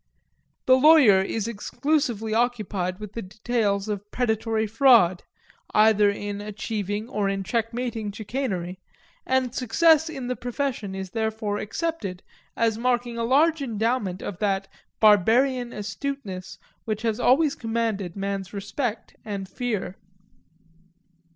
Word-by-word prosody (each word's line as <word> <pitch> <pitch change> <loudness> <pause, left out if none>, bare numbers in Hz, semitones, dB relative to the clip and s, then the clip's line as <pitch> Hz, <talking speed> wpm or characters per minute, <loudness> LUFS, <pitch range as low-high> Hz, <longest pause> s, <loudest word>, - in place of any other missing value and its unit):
The 255 - +6
lawyer 260 -8 +7
is 210 +2 -2
exclusively 235 0 -1
occupied 215 -6 -1
with 210 -1 -8
the 230 - -4
details 205 0 -1
of 205 -1 -4
predatory 220 -2 0
fraud, 220 -6 +5 0.5
either 215 -1 +5
in 205 0 -4
achieving 210 0 -4
or 210 -5 -1
in 195 0 -2
checkmating 230 0 -2
chicanery, 200 -5 -4 0.5
and 260 -2 +1
success 320 +6 +3
in 270 -5 -6
the 250 +1 -2
profession 245 -6 -3
is 190 -1 -6
therefore 220 -2 -2
accepted 215 - -4 0.3
as 225 -1 +1
marking 240 -1 0
a - - 0
large 300 +6 +3
endowment 220 -5 -1
of 185 - -6
that 195 -2 0 0.3
barbarian 235 +5 +4
astuteness 205 -2 -5 0.3
which 215 0 -3
has 225 -1 0
always 280 +4 +4
commanded 225 -6 -2
men's 195 -1 -4
respect 210 +4 -4
and 200 -3 -5
fear. 210 -3 -3
220 Hz, 120 wpm, -25 LUFS, 200-245 Hz, 0.5 s, lawyer